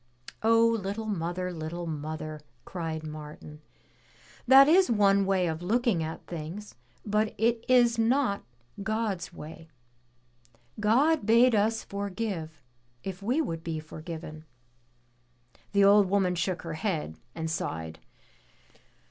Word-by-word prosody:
"Oh, 230 +1 +5
little 220 -1 -2
mother, 180 -2 -3
little 170 +1 -5
mother," 155 -1 -5 0.2
cried 165 -3 -4
Martin, 150 0 -9 0.9
"that 270 +2 +9
is 365 +4 +5
one 200 -3 +3
way 190 -2 +2
of 160 -1 -3
looking 225 -1 +1
at 160 0 -5
things 175 +5 -7 0.3
but 215 +1 0
it 230 +1 +1
is 240 -2 +4
not 230 -2 +2 0.4
God's 210 -3 -2
way. 165 0 -11 1.1
God 260 +6 +3
bade 235 +2 +6
us 220 +1 +1
forgive 195 - -5 0.4
if 190 0 -6
we 245 +10 +1
would 165 - -5
be 165 -2 -3
forgiven." 155 0 -8 1.3
The 200 -1 +4
old 200 -1 +6
woman 190 -2 +2
shook 180 +1 -2
her 165 -1 -5
head 155 - -2 0.2
and 160 -1 -3
sighed. 80 - -4
195 Hz, 120 wpm, -28 LUFS, 160-225 Hz, 1.3 s, that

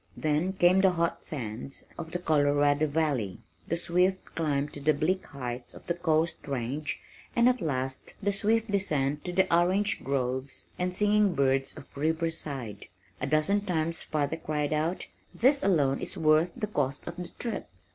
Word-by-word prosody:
Then 155 +5 +1
came 185 0 +5
the 190 -1 +5
hot 170 -1 -1
sand 125 -2 -5
of 160 -1 -6
the 175 - -2
Colorado 145 -2 +3
valley, 145 - 0 0.3
the 170 - 0
swift 180 +2 +1
climb 145 -3 0
to - - -9
the 155 +2 +3
bleak 175 +6 0
heights 125 -3 -6
of - - -13
the 170 - 0
coast 165 -1 0
range 140 +3 -2 0.4
and, 235 0 +5
at 250 0 +2
last, 130 -4 -3
the 205 -1 +1
swift 215 +2 +1
descent 150 -8 +1
to 180 - -2
the 190 +1 +3
orange 190 +5 +2
groves 130 0 -1
and 180 0 0
singing 205 0 +3
birds 135 0 +1
of - - -13
Riverside. 150 - -2 0.3
A - - -1
dozen 155 +8 +2
times 165 -3 0
father 155 +1 -1
cried 150 -2 -1
out, 160 +4 0 0.3
"This 270 +4 +4
alone 145 - +2
is - - -5
worth 155 +2 +4
the 230 - -1
cost 145 -9 -2
of 170 - -6
the 180 -1 -5
trip." 235 - -4
155 Hz, 165 wpm, -29 LUFS, 140-180 Hz, 0.4 s, came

